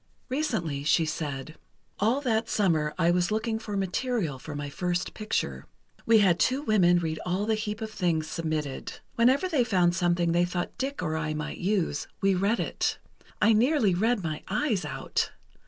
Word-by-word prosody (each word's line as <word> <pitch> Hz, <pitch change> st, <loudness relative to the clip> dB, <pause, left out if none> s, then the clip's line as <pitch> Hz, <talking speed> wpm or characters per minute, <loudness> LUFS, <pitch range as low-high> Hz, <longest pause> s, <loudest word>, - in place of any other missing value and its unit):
Recently, 215 Hz, -, -1 dB
she 160 Hz, +2 st, +3 dB
said: 155 Hz, -2 st, -4 dB, 0.4 s
"All 230 Hz, +7 st, +2 dB
that 225 Hz, -4 st, 0 dB
summer 160 Hz, -7 st, +1 dB
I 170 Hz, -1 st, +3 dB
was 175 Hz, 0 st, +2 dB
looking 220 Hz, +1 st, -1 dB
for 210 Hz, -3 st, -4 dB
material 195 Hz, -, -1 dB
for 150 Hz, +3 st, -7 dB
my 145 Hz, 0 st, -4 dB
first 180 Hz, +4 st, -2 dB
picture. 70 Hz, -, -3 dB, 0.4 s
We 225 Hz, 0 st, +7 dB
had 185 Hz, -4 st, +4 dB
two 265 Hz, +3 st, +2 dB
women 185 Hz, -8 st, +4 dB
read 160 Hz, -2 st, -2 dB
all 185 Hz, +3 st, -1 dB
the 220 Hz, -, +1 dB
heap 215 Hz, 0 st, -3 dB
of 220 Hz, -1 st, -4 dB
things 170 Hz, -6 st, 0 dB
submitted. 155 Hz, -4 st, -3 dB, 0.2 s
Whenever 260 Hz, +9 st, +3 dB
they 300 Hz, -8 st, +2 dB
found 180 Hz, -6 st, +2 dB
something 175 Hz, -2 st, +2 dB
they 175 Hz, +1 st, +3 dB
thought 175 Hz, 0 st, -3 dB
Dick 270 Hz, +1 st, -2 dB
or 155 Hz, -1 st, -1 dB
I 155 Hz, -1 st, -2 dB
might 150 Hz, 0 st, -5 dB
use, 180 Hz, -6 st, 0 dB
we 195 Hz, 0 st, +3 dB
read 200 Hz, +5 st, +1 dB
it. -, -, -1 dB, 0.5 s
I 225 Hz, -, +6 dB
nearly 235 Hz, -, +3 dB
read 215 Hz, +3 st, +1 dB
my 155 Hz, -2 st, -3 dB
eyes 215 Hz, -2 st, 0 dB
out. -, -, -2 dB
185 Hz, 175 wpm, -27 LUFS, 160-220 Hz, 0.5 s, We